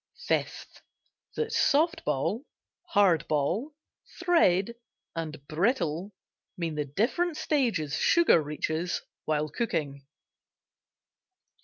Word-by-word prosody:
FIFTH. - - -2 0.5
That 460 0 -2
"soft 320 +4 +2
ball," 150 - -1 0.4
"hard 190 -6 +3
ball," 175 - -1 0.4
"thread," 235 - +3 0.4
and 155 -3 -5
"brittle" 180 - 0 0.4
mean 165 -3 -2
the 150 -1 -2
different 280 - 0
stages 225 - 0
sugar 340 - +5
reaches 155 +3 -2 0.2
while 155 0 0
cooking. 145 - -3
175 Hz, 90 wpm, -28 LUFS, -, 0.5 s, sugar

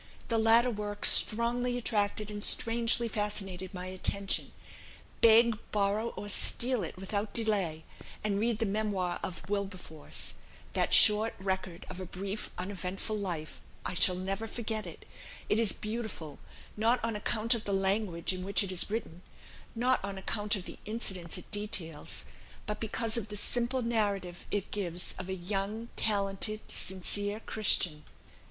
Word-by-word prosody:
The 230 -1 +1
latter 230 +2 +5
work 205 -1 -2
strongly 240 +2 +5
attracted 210 -2 -1
and 205 0 -6
strangely 230 +1 +3
fascinated 195 -4 -2
my 180 -2 -6
attention. 185 +1 -1 0.7
Beg, 230 0 +6
borrow, 205 +2 0
or 205 - -5
steal 240 +3 +4
it 170 - -6
without 200 +2 -3
delay; 195 -9 +1 0.4
and 205 -1 0
read 230 0 0
the 225 - 0
'Memoir 200 -3 -1
of 180 - -5
Wilberforce,' 190 -6 -2 0.4
that - - 0
short 215 +1 +7
record 190 -2 -4
of 180 - -8
a 185 - -6
brief 195 +4 -5
uneventful 190 +2 -4
life; 175 -7 -5 0.2
I - - 0
shall 180 +1 +4
never 195 +4 -3
forget 220 -3 -2
it; 165 - -10 0.4
it 210 - +2
is 225 -3 +5
beautiful, 215 -9 -6 0.4
not 230 +4 +2
on 230 -1 -2
account 220 +2 0
of 230 -2 -4
the 200 - -2
language 195 -2 0
in 185 0 -5
which 200 +2 +3
it 190 - -3
is 185 +1 +2
written, 205 -6 -5 0.5
not 250 0 +1
on 195 0 -4
account 205 +2 -1
of 190 -3 -6
the - - -9
incidents 190 -6 -2
it - - -10
details, 180 -7 -2 0.4
but 210 -1 -4
because 225 +1 +1
of 225 -3 -3
the 210 - -6
simple 245 +4 -1
narrative 200 -6 -2
it 205 -2 -2
gives 180 -3 -2
of 185 0 -6
a 190 - -2
young 200 +5 -3
talented 205 +1 0
sincere 205 +3 -1
Christian." 180 -9 +3
205 Hz, 150 wpm, -30 LUFS, 190-220 Hz, 0.7 s, short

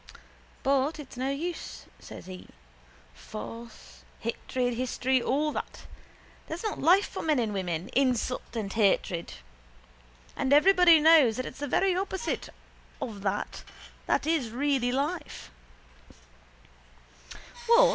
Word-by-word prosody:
—But 275 +3 +2
it's 295 -4 -10
no 260 +2 -2
use, 325 +5 -5
says - - -11
he. 185 0 -10 0.7
Force, 230 - -10 0.2
hatred, 245 +2 -2
history, 255 +1 0
all 295 +5 0
that. - - -6 0.6
That's 330 +5 -5
not 430 - -3
life 365 +7 +5
for - - -6
men 310 -3 +1
and 225 -4 0
women, 180 -2 -3
insult 255 -2 0
and 205 -4 -3
hatred. 190 -5 +1 1.0
And 265 - +1
everybody 350 +1 +7
knows 300 -8 +6
that 255 - -2
it's - - -8
the 290 - -3
very 375 +7 +2
opposite 380 +3 -3 0.5
of 210 -4 -5
that 195 -1 -3 0.4
that - - +1
is 310 -7 +1
really 260 0 0
life. 280 - -3
260 Hz, 115 wpm, -28 LUFS, 230-315 Hz, 1.0 s, everybody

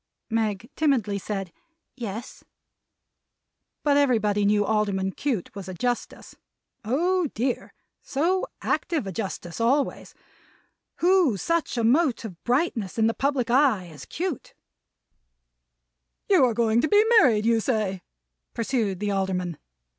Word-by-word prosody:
Meg 220 -1 -1
timidly 240 -10 +1
said, 195 -3 -5 0.4
"Yes." 225 -2 -7 1.4
But 285 -1 +3
everybody 215 -7 +2
knew 205 0 +3
Alderman 200 -3 0
Cute 240 -5 -3
was 195 -2 -7
a 185 - -6
Justice! 245 +5 -3 0.5
Oh 340 - +1
dear, 245 +2 -2 0.3
so 345 +7 0 0.2
active 325 - -1
a 195 - -4
Justice 190 -1 -5
always! 270 +5 0 0.9
Who 350 - +4
such 335 - -1
a 235 - +1
mote 255 +1 +2
of 180 -6 -9
brightness 245 - 0
in 220 - +3
the 225 - +2
public 270 -3 0
eye, 245 -9 +3
as 150 -4 -11
Cute! 355 -6 -5 1.7
"You - - +5
are 235 -3 0
going 230 0 +2
to 310 - +1
be 415 +4 +5
married, 220 - +3
you 230 0 +3
say," 210 -6 -1 0.5
pursued 225 -5 -1
the 205 -1 0
Alderman. 185 -4 -2
230 Hz, 125 wpm, -25 LUFS, 200-275 Hz, 1.7 s, You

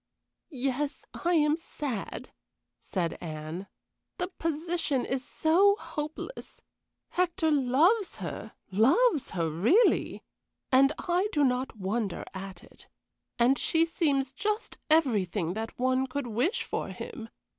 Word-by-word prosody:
"Yes, 275 0 -2
I 350 0 0
am 300 0 +3
sad," 285 - -5 0.5
said 175 -4 -3
Anne. 160 +3 -6 0.5
"The 360 -1 -2
position 325 -5 -1
is 265 0 -2
so 340 +8 +4
hopeless. 310 +4 -7 0.5
Hector 350 -2 +1
loves 305 - +3
her - - -6 0.2
loves 275 - +3
her 165 -1 +1
really 220 - +3 0.5
and 275 +2 +6
I 360 +3 +1
do 295 -5 +2
not 255 -2 0
wonder 200 0 -2
at 190 -2 -8
it; - - -15 0.5
and 245 +3 +4
she 325 0 +3
seems 280 -6 0
just 425 - -3
everything 210 - +2
that 220 +2 -5
one 255 +1 +1
could 280 +1 -3
wish 285 - 0
for - - -3
him. 225 -4 -7
275 Hz, 120 wpm, -29 LUFS, 225-330 Hz, 0.5 s, and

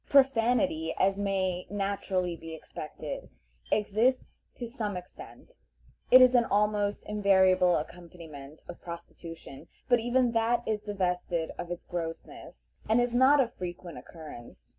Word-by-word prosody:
Profanity, 275 +3 +3
as 195 +1 +2
may 190 -3 -1
naturally 195 -3 -2
be 165 -1 -8
expected, 155 -1 -8 0.4
exists 220 +5 0
to 245 - -5
some 220 -5 -4
extent; 180 - -12 0.6
it 255 0 +9
is 255 0 +5
an 245 -1 +5
almost 205 -1 +1
invariable 190 -3 +3
accompaniment 155 -3 -8
of 175 - -9
prostitution, 170 -4 -10 0.2
but 245 -1 +4
even 245 +1 +2
that 235 +1 +1
is 215 -1 -1
divested 180 -5 -2
of 175 - -5
its 175 0 -5
grossness, 165 - -7 0.2
and 225 +2 +4
is 245 0 +1
not 260 +4 +5
of 245 -3 +1
frequent 175 -1 -7
occurrence. 155 -8 -12
195 Hz, 130 wpm, -29 LUFS, 175-235 Hz, 0.6 s, it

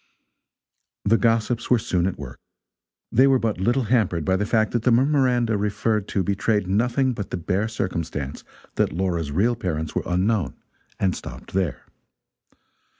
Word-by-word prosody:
The 115 +3 +4
gossips 115 +1 +1
were 125 - +5
soon 90 -5 0
at 95 - -3
work. 70 -3 -9 0.7
They 130 +4 +5
were 135 -1 +5
but 110 -5 -1
little 120 +7 +2
hampered 105 -9 +1
by 95 - +2
the 105 +2 -1
fact 110 0 +2
that 120 - 0
the 125 - +2
memoranda 125 -4 +2
referred 105 0 0
to 95 - 0
betrayed 100 +2 0
nothing 120 +7 +1
but 100 -4 -5
the - - -3
bare 95 +5 -1
circumstance 85 -9 -4 0.3
that - - +2
Laura's 85 -3 -1
real 110 +10 +2
parents 80 -8 -3
were - - 0
unknown, 95 +2 0 0.4
and 95 -2 +1
stopped - - -9
there. 95 -4 -1
105 Hz, 155 wpm, -23 LUFS, 90-115 Hz, 0.7 s, were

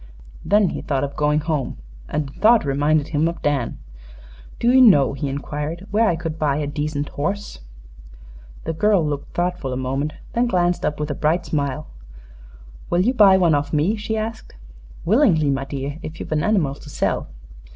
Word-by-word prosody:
Then 200 +3 +3
he - - -5
thought 140 -2 -1
of 140 0 -4
going 150 0 +1
home, 150 - -2 0.3
and 150 -2 -2
the 135 - -14
thought 220 0 +5
reminded 145 +2 +1
him 155 0 +1
of 170 - -5
Dan. 140 -5 0 0.8
"Do 235 - +3
you 260 +1 +6
know," 145 - +6
he 140 +1 -3
inquired, 150 +5 -4
"where 220 +2 +3
I 170 - +1
could 165 -1 -5
buy 145 -2 +1
a 150 - -1
decent 145 0 -3
horse?" 195 - -4 1.0
The 165 - -3
girl 200 -1 +2
looked 145 -1 -4
thoughtful 175 -6 -1
a 125 - -2
moment; 135 +4 -2 0.2
then 240 +1 +2
glanced 175 -5 +1
up 150 - -3
with 150 0 -2
a - - 0
bright 155 +5 0
smile. 145 0 -2 1.0
"Will 175 - +2
you 240 +7 +2
buy 200 -6 +6
one 175 -4 +3
off 145 0 0
me?" 155 +8 +2
she 220 +1 -3
asked. 220 - -5 0.5
"Willingly, 175 - +3
my 135 0 -2
dear, 140 +2 -5
if 160 +1 -8
you've - - -7
an 155 -1 +1
animal 185 -11 +1
to 145 +1 -12
sell." - - -1
155 Hz, 185 wpm, -21 LUFS, 145-190 Hz, 1.0 s, you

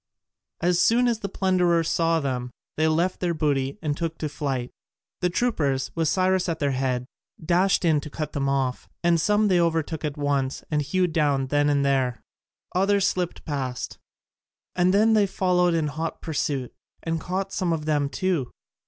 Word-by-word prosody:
As 175 +1 +2
soon 240 +6 +4
as 235 -2 0
the 200 - -4
plunderers 180 -4 +2
saw 165 -1 +2
them, 125 -4 -2 0.3
they 155 +1 +2
left 170 +4 +1
their 175 -2 0
booty 140 -2 0
and 150 -2 0
took 165 +1 -3
to 155 - -3
flight. 135 -4 -3 0.5
The 180 - +1
troopers, 155 - 0
with 165 -1 0
Cyrus 185 +1 +2
at 165 - -1
their 140 -2 0
head, 130 -1 -1 0.4
dashed 180 +2 +2
in 155 -3 +3
to 150 - -8
cut 150 0 -5
them 140 -2 0
off, 135 -2 -1
and 170 -1 +3
some 210 +4 +3
they 180 -3 +3
overtook 165 -2 -1
at 150 -1 -3
once 140 -2 -1
and 150 -1 +2
hewed 175 +4 0
down 140 -5 +1
then 145 +1 +2
and 140 -1 +2
there; 130 -4 0 0.5
others 195 +1 +2
slipped 180 -2 -2
past, 130 -5 -4 0.8
and 180 0 +3
then 215 +3 +4
they 210 -2 +4
followed 180 -2 +2
in 160 -2 +1
hot 155 +3 -4
pursuit, 140 -5 -2 0.3
and 165 -1 -2
caught 190 +2 -3
some 180 -2 0
of 160 -2 -2
them 145 -2 +1
too. 170 -7 -1
160 Hz, 180 wpm, -25 LUFS, 140-180 Hz, 0.8 s, soon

